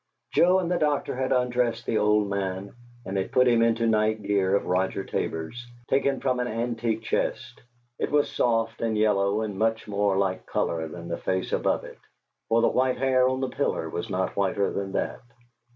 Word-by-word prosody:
Joe 180 +2 +5
and 180 -2 -1
the 180 - +1
doctor 150 -4 0
had 130 0 -2
undressed 125 -2 +1
the 110 - +1
old 105 0 +3
man, 100 0 -3 0.3
and 95 +1 -3
had 95 - -2
put 125 0 +4
him 120 -1 +4
into 115 0 +2
night 110 -1 +1
gear 100 -1 +2
of - - 0
Roger 95 +1 0
Tabor's, 80 +11 -4 0.3
taken 135 0 +2
from 125 -2 0
an 125 - -1
antique 115 -1 -2
chest; - - -2 0.4
it - - -1
was 145 0 +2
soft 115 -1 0
and 110 -2 0
yellow 105 -1 +2
and 105 -3 -4
much 110 0 0
more 100 -1 +1
like 95 -1 -1
color 80 -1 -1
than 85 +1 -9
the 85 - -4
face 95 0 -2
above - - +1
it, - - -11 0.5
for 115 +1 +3
the - - +5
white 130 0 +1
hair 130 -1 +3
on 130 0 -2
the 130 - -1
pillow - - -1
was - - -4
not - - -1
whiter 100 0 +1
than 95 -1 -4
that. - - -2
110 Hz, 195 wpm, -26 LUFS, 100-125 Hz, 0.5 s, Joe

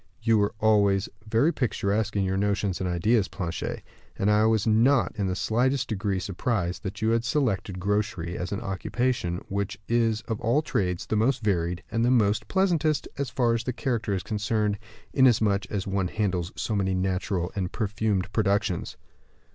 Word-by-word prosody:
You 115 -1 +4
were 100 0 0
always 100 -3 +3 0.2
very 130 +10 +3
picturesque 105 -3 -1
in 100 - +2
your 95 0 0
notions 100 -1 0
and 90 - -1
ideas, 100 +5 +2
Planchet; 85 -4 -4 0.3
and 100 +2 +2
I 105 +1 +4
was 110 -3 +2
not 120 +4 +4
in 100 -3 -1
the 90 - -1
slightest 125 +6 +1
degree 100 -2 -1
surprised 95 -1 -2
to 100 - -3
find 100 +2 -11
you 110 - +3
had 115 0 +2
selected 110 -8 -1
grocery 95 -3 -1
as 90 - -4
an 100 - -2
occupation, 95 -1 -2
which 100 0 -3
is 115 -2 +2
of 110 -2 -5
all 130 +8 +2
trades 90 - -1
the - - -1
most 120 +4 +1
varied, 90 -2 0
and 115 +1 +1
the 120 - +3
very 110 -5 +4
pleasantest, 165 -6 +1
as 140 -3 -1
far 120 -2 +1
as 115 0 -1
the 125 - -2
character 115 -2 -2
is 95 - -3
concerned; 105 -1 -1 0.3
inasmuch 110 -6 +3
as 100 -3 -2
one 95 -1 0
handles 90 -3 -1
so 110 - -2
many 95 -2 +1
natural 90 -1 -1
and 95 -3 -2
perfumed 105 -3 -1
productions." 100 -4 0
105 Hz, 180 wpm, -26 LUFS, 95-115 Hz, 0.3 s, You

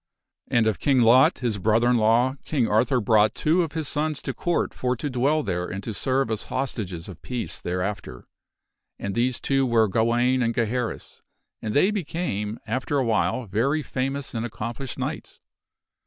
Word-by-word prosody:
And 115 -2 +2
of 110 -3 0
King 135 -3 +3
Lot, 125 +3 +6
his 115 -5 -2
brother 110 +4 +3
in 125 0 +4
law, 115 +4 +3
King 130 -7 0
Arthur 125 +5 +2
brought 110 -1 +3
two 165 +4 +2
of 165 -3 -3
his 160 -3 -3
sons 150 0 -1
to - - -3
Court 175 -1 -1
for 125 0 -1
to 140 +4 -4
dwell 140 +5 +1
there 90 -3 -2
and 95 +2 -6
to 110 - -4
serve 130 +1 0
as 110 - -3
hostages 100 -10 -3
of 90 -5 -10
peace 125 -2 -5
there 90 +1 -2
after. 95 -11 -5 0.7
And 100 - -4
these 120 +2 +1
two 135 -1 +1
were 115 -3 +3
Gawaine 120 +5 +2
and 115 -1 0
Geharris 120 +1 -2 0.4
and 110 -1 -3
they 185 +8 +4
became, 145 - -3
after 130 +3 -1
awhile, 120 0 +1
very 135 +10 0
famous 135 +2 -3
and 115 -1 -2
accomplished 120 +3 -5
knights. - - -5
120 Hz, 175 wpm, -24 LUFS, 110-135 Hz, 0.7 s, Lot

